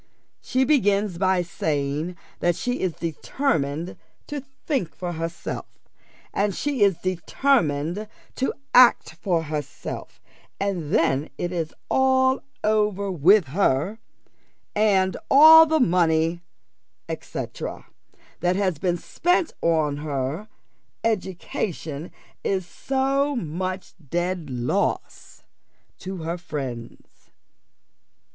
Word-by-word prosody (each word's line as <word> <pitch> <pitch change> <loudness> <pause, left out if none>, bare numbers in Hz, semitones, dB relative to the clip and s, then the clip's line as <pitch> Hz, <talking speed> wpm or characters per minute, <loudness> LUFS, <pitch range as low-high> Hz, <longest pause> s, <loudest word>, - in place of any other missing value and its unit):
She 260 +1 +1
begins 205 - +2
by 185 -1 +2
saying 155 -1 -2 0.2
that 175 -1 +2
she 245 +6 -2
is 185 -3 -1
determined 165 - -2 0.3
to 290 -1 -5 0.2
think 265 - -1
for 180 -1 -4
herself, 165 +1 -5 0.7
and 200 -1 0
she 285 -5 -2
is 195 -4 +4
determined 185 - 0 0.3
to 265 - +1 0.2
act 250 -1 +6
for 175 -5 0
herself 150 -1 -6 0.4
and 185 -6 -2
then 145 -2 +2
it 175 - -2
is 165 -3 -2 0.2
all 260 0 +3 0.2
over 210 -2 +1
with 180 0 +4
her: 175 +4 +1 0.8
and 195 -3 +3
all 320 +3 +9
the 315 0 +2
money, 170 -4 +2 0.7
&c. - - -5 1.0
that 180 +1 +1
has 185 -6 0
been 175 -2 0
spent 350 - 0
upon 155 -3 +2
her 145 +5 -3 0.6
education 180 -6 -3 0.3
is 190 -2 0
so 275 +7 0
much 185 -1 -4 0.2
dead 175 -1 -2
loss 125 -1 -2 0.6
to 185 -3 -6
her 170 +2 -3
friends. 130 -8 -7
180 Hz, 100 wpm, -24 LUFS, 160-215 Hz, 1.0 s, all